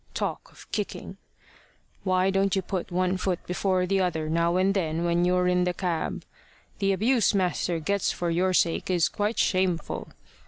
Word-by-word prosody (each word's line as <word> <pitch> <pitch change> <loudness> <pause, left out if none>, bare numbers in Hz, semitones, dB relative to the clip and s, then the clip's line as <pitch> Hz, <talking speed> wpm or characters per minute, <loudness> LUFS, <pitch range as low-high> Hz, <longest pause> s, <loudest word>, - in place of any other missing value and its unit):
Talk - - -3
of - - -16
kicking! - - -4 0.9
Why 185 0 +2
don't 195 0 +1
you 190 - 0
put 185 -4 -3
one 185 +1 +1
foot 185 -1 -2
before 185 0 0
the 195 +1 +1
other 160 -4 -1
now 170 +2 +2
and 190 +1 +3
then 165 -3 -1
when 170 0 +2
you're 180 0 +2
in 180 0 +2
the 180 0 -1
cab? 175 -4 -2 0.6
The 195 -1 +2
abuse 220 +2 +2
master 175 -3 0
gets 200 +5 0
for 175 -1 -2
your 185 +3 +2
sake 170 -1 +1
is 175 -3 +3
quite 210 +2 -2
shameful. 185 -3 0
180 Hz, 170 wpm, -26 LUFS, 175-195 Hz, 0.9 s, and